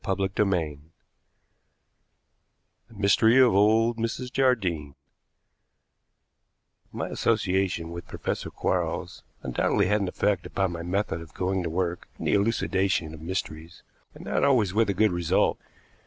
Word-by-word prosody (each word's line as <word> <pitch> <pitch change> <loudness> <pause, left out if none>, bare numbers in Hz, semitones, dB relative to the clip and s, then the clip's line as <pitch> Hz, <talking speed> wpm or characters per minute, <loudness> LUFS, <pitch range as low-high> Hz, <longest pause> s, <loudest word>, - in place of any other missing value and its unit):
CHAPTER 95 +1 0
VI 80 -7 -1 2.1
THE 115 - -18
MYSTERY 105 +4 +4
OF 130 -4 +6
"OLD 110 +4 +3
MRS 120 +2 -3
JARDINE" 95 - 0 2.0
My - - -4
association 95 -6 0
with 85 -1 -8
Professor - - -4
Quarles - - -2 0.2
undoubtedly 65 -2 +1
had 105 +3 +1
an 100 - -1
effect 95 0 0
upon 95 -2 -1
my 85 -1 -5
method 90 -1 -2
of 80 -2 -13
going 95 +1 -1
to 85 - -3
work 85 +1 -2
in - - -7
the - - +1
elucidation 95 -5 +1
of 80 - -10
mysteries, 85 -1 -5 0.3
and - - -11
not - - 0
always 115 -9 +3
with 110 0 +2
a 100 - 0
good 110 +2 +3
result. 85 -2 +1
95 Hz, 135 wpm, -26 LUFS, 85-105 Hz, 2.1 s, OF